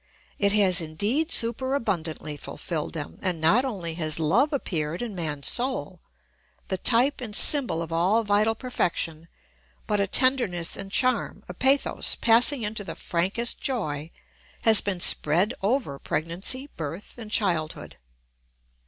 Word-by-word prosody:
It 200 -1 +3
has 190 -4 +3
indeed 210 - -2
super 260 +4 +1
abundantly 160 - -3
fulfilled 155 +2 -5
them, 150 -3 -7
and 180 -4 -2
not 185 +11 +4
only 190 -11 -4
has 155 -1 0
love 190 - +2
appeared 170 - -3
in 230 -3 -5
man's 150 -6 -3
soul, 260 +2 -1 0.7
the 190 - -1
type 255 +6 +3
and 220 -4 -5
symbol 240 - +5
of 165 0 -7
all 190 +7 +2
vital 210 +2 +2
perfection, 170 -9 -3 0.6
but 210 -1 0
a 200 - +1
tenderness 225 -9 +2
and 195 0 -7
charm, 255 -1 +1
a 180 - -7
pathos 270 +8 +1
passing 240 +3 +3
into 210 0 -4
the - - -7
frankest 195 +7 -2
joy, 160 - -2 0.5
has 220 -2 +7
been 195 -3 -2
spread 175 +11 +3
over 200 - -1
pregnancy, 175 - -4
birth, 165 +5 -7
and 220 -2 -8
childhood. 175 -8 -1
200 Hz, 140 wpm, -25 LUFS, 165-240 Hz, 0.7 s, has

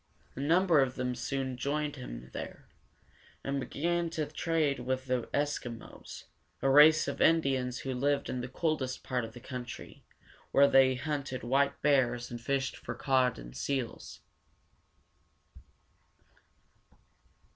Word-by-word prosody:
A - - -7
number 165 +3 +4
of 130 -2 +1
them 125 -1 -2
soon 130 0 -3
joined 145 +3 -2
him 65 - -8
there, - - -7 0.8
and 140 0 -1
began 170 +5 -1
to 160 -2 -2
trade 155 -2 0
with 130 +1 -2
the 125 -2 -1
Es´ki 140 -5 -1
mos, - - -11 0.4
a 135 - +2
race 155 +2 +7
of - - -3
Indians 135 -6 +2
who 135 - -3
lived 140 +3 0
in 125 - -3
the 125 - -4
coldest 130 -2 -2
part 125 -2 -1
of 110 0 -7
the 120 - -10
country, 125 0 -8 0.5
where 140 0 +6
they 135 -1 +5
hunted 140 -2 -3
white 140 +3 +1
bears 125 -4 +2
and 120 -1 -6
fished 135 +1 -1
for 120 - -6
cod 130 -1 +2
and - - -10
seals. 120 - -4
135 Hz, 135 wpm, -31 LUFS, 125-145 Hz, 0.8 s, race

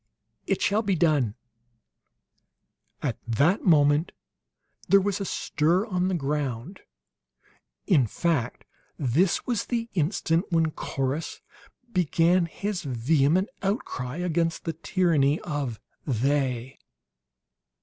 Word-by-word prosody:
"It - - 0
shall 210 +2 +2
be 200 -4 0
done!" 150 -10 +2 1.7
At 130 -6 -2
that 145 - +2
moment 150 -1 +4 0.8
there 195 +2 +7
was 200 +1 -1
a - - -2
stir 175 +3 +1
on 180 -3 0
the 190 - 0
ground. 145 - -3 1.1
In 140 -10 +3
fact, 140 -2 -1 0.3
this 155 +7 +1
was 240 -4 -1
the 235 -1 -2
instant 165 +1 +1
when 165 -2 +2
Corrus 140 +2 -3 0.5
began 175 0 +3
his 200 +2 -4
vehement 145 - +1
outcry 160 - -3
against 170 -1 -1
the 165 - -2
tyranny 160 -3 +1
of 140 -8 -3 0.3
"They." 130 0 -1
160 Hz, 105 wpm, -26 LUFS, 140-185 Hz, 1.7 s, there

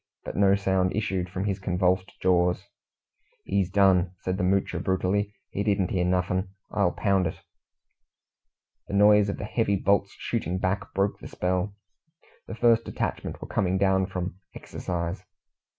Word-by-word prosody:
But - - -6
no 100 0 +4
sound 95 -2 +1
issued 95 -4 -1
from 95 +2 -3
his 100 -1 -1
convulsed 95 0 0
jaws. 90 -1 +2 0.8
"He's 95 -2 0
done," 95 -2 +3
said 95 0 -2
the - - 0
Moocher 95 -1 +1
brutally. 95 +3 0 0.2
"He 100 - -2
didn't 100 -3 +1
hear 90 -2 +1
nuffin', 90 +1 0 0.2
I'll 100 -4 +2
pound 95 -3 +1
it." 80 - -6 1.5
The 100 - -3
noise 105 0 +6
of 100 - -3
the - - -5
heavy 105 -2 +1
bolts 100 +1 +1
shooting 95 -6 -2
back 95 +2 -2
broke 100 +1 0
the - - -9
spell. 90 +2 -1 0.7
The - - -6
first 115 0 +4
detachment - - -4
were - - -7
coming 95 -1 0
down 95 -1 +2
from 90 -1 -5 0.2
"exercise." 85 +1 -4
95 Hz, 150 wpm, -26 LUFS, 90-100 Hz, 1.5 s, noise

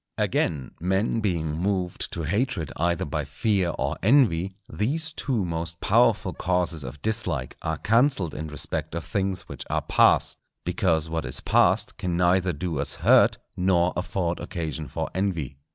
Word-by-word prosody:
Again, 70 -6 0
men 95 +6 0
being 85 -7 -1
moved 90 0 -1
to 85 - -3
hatred 100 - -1
either 85 +1 0
by 75 +1 -2
fear 90 +7 0
or 70 +3 -2
envy, 100 - +4 0.2
these 155 +9 -1
two 130 - -1
most 85 -1 -4
powerful 60 - +3
causes 90 -3 0
of 65 +3 -9
dislike 90 - -1
are 80 -1 -2
cancelled 115 - +2
in 80 - -5
respect 75 +1 -3
of 85 - -4
things 95 -2 -1
which 70 -7 -8
are - - 0
past, - - +3 0.3
because 80 -4 +1
what 80 0 -2
is 65 -1 -2
past - - +2
can 90 -2 -1
neither 90 +1 +3
do 80 -1 -3
us 70 - 0
hurt, - - +6 0.2
nor 90 -1 +2
afford 90 -1 -2
occasion 80 -3 -4
for 65 - -3
envy. 85 -8 -2
85 Hz, 155 wpm, -25 LUFS, 80-95 Hz, 0.3 s, hurt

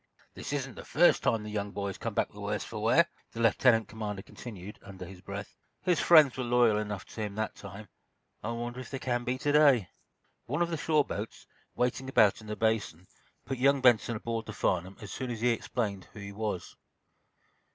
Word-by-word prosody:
"This - - -6
isn't - - -2
the - - -9
first - - +4
time 110 -2 +1
the 105 - -6
young 105 -1 -2
man 100 - -2
has 100 - -4
come - - -4
back - - +1
the - - -13
worse - - -2
for - - -6
wear," - - +5 0.3
the 115 - -7
lieutenant 115 0 +4
commander 105 -3 -5
continued, 105 -4 -9
under 95 -2 -9
his 90 0 -11
breath. 100 +1 -7 0.3
"His 180 -5 +2
friends 155 -6 +7
were 130 - -2
loyal 120 -3 +4
enough 105 -3 -4
to 110 - -8
him, 105 -2 -3
that 110 0 -2
time. 105 +2 -10 0.6
I 110 - -2
wonder 120 +1 -4
if 130 - -8
they 135 - -4
can 120 -2 -1
be, 125 +1 -1
to 145 +2 0
day?" 140 -10 +5 0.6
One 145 +7 +1
of 170 - -3
the - - 0
shore 150 -1 +2
boats, 105 +2 -6 0.3
waiting 125 +2 -1
about 110 -5 +4
in 110 - -12
the 105 - -3
Basin, 110 -7 0 0.4
put 130 - -4
young 140 +2 +4
Benson 120 -2 +4
aboard 115 +1 -3
the 110 - -6
"Farnum" 90 +1 -1
as 105 - -8
soon 130 -1 -4
as 115 -2 -4
he 125 - +3
explained 110 -4 -2
who - - -10
he 100 0 -7
was. 105 -4 -4
110 Hz, 215 wpm, -30 LUFS, 105-125 Hz, 0.6 s, friends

